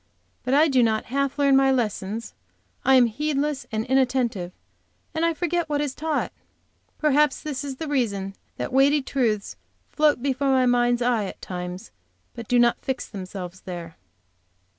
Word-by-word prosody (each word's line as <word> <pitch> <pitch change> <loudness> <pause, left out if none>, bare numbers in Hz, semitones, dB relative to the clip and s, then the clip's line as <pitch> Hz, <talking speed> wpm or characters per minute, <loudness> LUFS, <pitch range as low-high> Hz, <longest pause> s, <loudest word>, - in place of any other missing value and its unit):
But 260 - +1
I 305 +3 +6
do 265 -4 +3
not 220 -2 +1
half 275 0 0
learn 280 -1 +4
my 270 0 +5
lessons, 225 -3 -2 0.5
I 265 - +5
am 250 -1 +7
heedless 285 +3 -1
and 220 0 -1
inattentive, 250 -8 +1 0.6
and 320 0 -1
I 335 -1 +2
forget 345 0 -1
what 295 -1 0
is 290 -2 -1
taught. 310 0 -2 0.7
Perhaps 300 -2 +2
this 290 -2 -4
is 275 -2 -5
the 315 +4 -5
reason 200 -9 -1 0.2
that - - -4
weighty 280 +2 +4
truths 225 -7 -1 0.3
float 300 -3 +3
before 275 0 0
my 260 -1 +4
mind's 245 0 +2
eye 235 -4 +1
at - - -8
times, 180 +3 -6 0.4
but 230 -2 -8
do 245 - +3
not 240 0 +3
fix 265 -1 -3
themselves 185 -2 -7
there. 170 -3 -7
260 Hz, 160 wpm, -24 LUFS, 220-285 Hz, 0.7 s, am